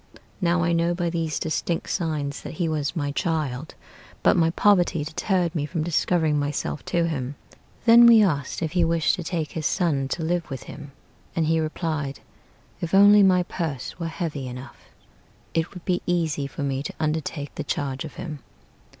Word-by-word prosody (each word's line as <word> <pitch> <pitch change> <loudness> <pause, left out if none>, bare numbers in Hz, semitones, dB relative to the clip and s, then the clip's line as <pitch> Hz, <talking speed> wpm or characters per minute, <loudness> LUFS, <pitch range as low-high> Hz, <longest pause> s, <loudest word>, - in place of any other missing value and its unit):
Now 175 -1 +2
I 170 - +1
knew 170 +1 +1
by 170 -1 -1
these 165 -2 -1
distinct 165 +1 -2
signs 150 -5 -2
that - - -8
he 170 +1 0
was 155 0 -1
my 145 -3 -1
child, 155 -4 -2 0.5
But - - +5
my 165 -2 +3
poverty 175 -3 +3
deterred 170 +2 0
me 150 -4 -2
from 160 -1 -2
discovering 160 -2 +1
myself 145 +1 -2
to 170 -1 +1
him." 140 -4 -3 0.5
Then 235 0 +9
we 230 -2 +8
asked 145 -4 -1
if 160 - -2
he 175 0 +2
wished 165 -1 +2
to 175 - -4
take 160 -2 -3
his 155 -3 -1
son 155 -7 0
to 160 +4 -3
live 170 +1 -1
with 135 -3 -6
him; 145 0 -10 0.4
And 165 - +1
he 160 +1 +2
replied, 155 -3 -3 0.6
"If 170 +2 -1
only 205 +1 +8
my 185 -2 +5
purse 160 -6 -4
were 165 - -2
heavy 160 -5 -4
enough, 125 +2 -9 0.7
It 165 0 0
would 180 - -10
be 180 -2 0
easy 160 -5 0
for 140 - -6
me 135 -1 -1
to - - -5
undertake 155 -2 -2
the - - -4
charge 135 -2 -3
of 155 - -9
him." 155 -4 -6
160 Hz, 185 wpm, -24 LUFS, 145-175 Hz, 0.7 s, Then